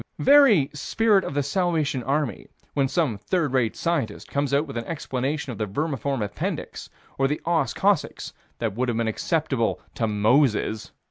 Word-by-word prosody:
Very 265 - +5
spirit 200 +7 +2
of 140 - -5
the 145 - +1
Salvation 155 -3 0
Army, 135 -3 -2 0.3
when 140 -2 +2
some 130 - 0
third 150 - -1
rate 120 -4 +1
scientist 145 -11 -2
comes 140 -1 0
out 140 +2 +2
with 140 - -9
an 115 -1 -3
explanation 145 -2 -3
of 115 - -8
the 105 - -1
vermiform 140 +1 -2
appendix 105 0 -4 0.3
or 135 - +3
the 150 +2 -2
os 160 -7 +1
coccygis - - 0 0.2
that 115 -4 -2
would 125 +4 -1
have 115 - -1
been 115 -1 0
acceptable 135 0 0
to 115 - -1
Moses. 110 0 +2
140 Hz, 170 wpm, -24 LUFS, 115-155 Hz, 0.3 s, Very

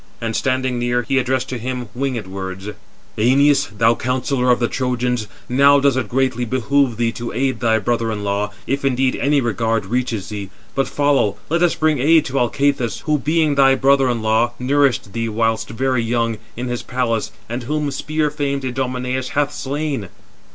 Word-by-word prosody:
And, 115 -1 -3
standing 130 -1 0
near, 120 0 0
he 135 +3 +1
addressed 130 0 0
to 125 - -4
him 125 0 -4
winged 130 -4 -2
words: 95 +1 -6 0.5
"Æneas, 135 -1 +3
thou 115 +2 +4
counsellor 125 +1 -1
of 125 - +4
the 120 - +1
Trojans, 125 -3 -1 0.2
now 140 +3 +5
does 140 -2 +3
it 125 -5 -2
greatly 130 -1 0
behove 130 +1 +1
thee 115 -1 +1
to 120 0 -6
aid 130 +1 -1
thy 115 -2 +2
brother 115 +1 0
in 105 -1 -4
law, 100 +1 -1 0.2
if 140 +1 -2
indeed 130 -1 +1
any 145 0 +2
regard 115 -2 0
reaches 115 -2 -2
thee. 100 -3 -6 0.2
But 135 - 0
follow, 145 -8 +1
let 170 +1 +2
us 175 -1 +3
bring 155 -3 +1
aid 155 +4 +4
to 135 +1 -1
Alcathous, 125 -1 0
who, 150 -2 0
being 155 +1 +1
thy 135 -1 +5
brother 135 -1 +3
in 115 -2 -1
law, 110 +2 +2
nourished 130 -6 +1
thee 115 0 -2
whilst 115 0 0
very 130 +2 0
young, 115 -1 -1 0.2
in 125 +1 -3
his 120 -1 -3
palace, 120 -3 -1 0.2
and 120 +2 -4
whom 150 +3 -2
spear 150 +2 -1
famed 140 -2 -2
Idomeneus 125 0 -2
hath 145 0 +1
slain." 140 - -3
125 Hz, 180 wpm, -19 LUFS, 115-140 Hz, 0.5 s, now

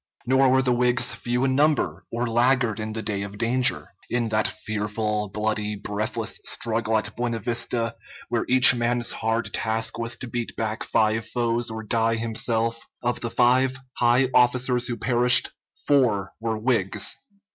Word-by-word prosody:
Nor 130 +1 +4
were 130 +1 +3
the 125 -1 +2
Whigs 125 0 +2
few 125 +1 -2
in 130 - +1
number 150 +2 +1
or 120 +1 -1
laggard 120 -1 +1
in 110 0 -4
the 110 0 -5
day 100 -2 -2
of 100 0 -7
danger. 125 +3 0 0.2
In 120 -2 -1
that 110 0 +1
fearful, 105 0 -3
bloody, 105 0 -2
breathless 110 +3 -3
struggle 115 -1 0
at 110 - -4
Buena 120 -1 -2
Vista, 115 0 -2 0.3
where - - -1
each 130 0 +7
man's 120 -1 0
hard 110 +1 -2
task 110 +1 -1
was 115 0 -1
to 130 - -7
beat 120 -1 -5
back 110 -1 -3
five 110 0 0
foes 120 -1 -1
or 110 0 -6
die 115 +1 +1
himself, 115 0 -1 0.2
of 120 0 -1
the 115 - -3
five 130 +2 +2 0.2
high 125 +2 +2
officers 125 0 +2
who 120 -2 -3
perished, 125 0 +4 0.3
four 115 -9 +2
were 110 -1 -2
Whigs. 110 -4 0
115 Hz, 160 wpm, -24 LUFS, 110-125 Hz, 0.3 s, each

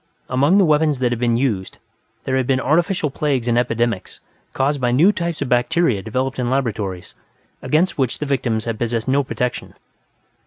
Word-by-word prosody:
Among 140 +9 +3
the 195 - +5
weapons 150 -2 +2
that 125 -1 0
had 120 - -2
been 120 -1 +1
used, 110 -8 -2 0.5
there 130 - -1
had 130 -2 0
been 130 -1 +2
artificial 165 +2 +1
plagues 135 -5 -1
and 120 - +2
epidemics, 115 -4 -1 0.3
caused 140 +1 0
by 125 - +2
new 160 +11 +5
types 170 -4 -3
of - - -6
bacteria 125 - +2
developed 130 +5 -3
in 120 -1 -1
laboratories, 110 -9 -2 0.5
against 155 +6 +1
which 130 -4 0
the 150 - -4
victims 120 -6 -1
had 115 -2 -3
possessed 115 -1 -2
no 140 +2 +2
protection. 125 -1 -4
130 Hz, 180 wpm, -20 LUFS, 120-145 Hz, 0.5 s, the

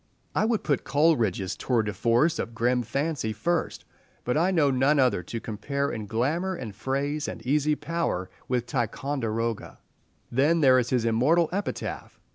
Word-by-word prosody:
I - - +2
would 225 -1 0
put 145 - 0
Coleridge's 120 - +1
tour 120 -4 0
de 105 -1 -3
force 120 - +2
of 115 - -4
grim 125 +2 +2
fancy 135 -1 -2
first, 165 - -2 0.4
but 125 - -1
I 170 +4 +3
know 160 -7 +3
none 135 +3 +3
other 130 -9 +3
to 115 +7 -5
compare 140 +6 -3
in 110 -2 -5
glamour 155 - 0
and 115 - -7
phrase 140 +6 -2
and 115 - -7
easy 150 +3 +2
power 165 - -2 0.2
with 125 -2 0
"Ticonderoga." 115 -2 -2 0.5
Then 145 +7 +3
there 130 -3 +6
is 120 -1 -1
his 125 -3 +1
immortal 145 +9 +3
epitaph. 200 +3 -4
130 Hz, 160 wpm, -26 LUFS, 115-150 Hz, 0.5 s, there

